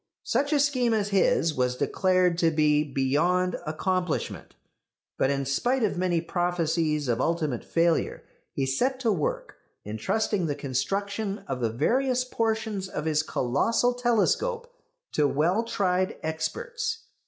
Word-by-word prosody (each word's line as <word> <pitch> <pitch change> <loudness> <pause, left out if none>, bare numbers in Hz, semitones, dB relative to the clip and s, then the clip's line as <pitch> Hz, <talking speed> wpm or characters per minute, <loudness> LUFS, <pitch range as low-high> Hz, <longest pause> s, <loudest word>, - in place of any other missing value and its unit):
Such 285 +1 0
a 295 - +3
scheme 255 -5 +2
as 205 -2 0
his 185 -4 +2
was 125 -2 0
declared 185 +3 +2
to 165 - +4
be 150 -1 +3
beyond 155 +7 +1
accomplishment. 180 +2 -2 0.6
But 135 - +3
in 140 -1 -1
spite 245 - +1
of 210 - +1
many 175 -2 +1
prophecies 165 -4 0
of 120 -1 0
ultimate 155 -7 -1
failure 165 0 +1 0.3
he 135 - -1
set 255 - 0
to 230 -3 +2
work, 160 -8 -2 0.3
entrusting 175 - -1
the 145 - -1
construction 195 - -2
of 130 - -3
the 115 -2 0
various 250 - +1
portions 220 -5 -2
of 150 - -4
his 155 -1 +2
colossal 160 - +1
telescope 450 - 0 0.4
to 150 -1 +2
well 170 +10 +2
tried 185 -5 0
experts. 455 - -3
180 Hz, 135 wpm, -26 LUFS, 150-225 Hz, 0.6 s, to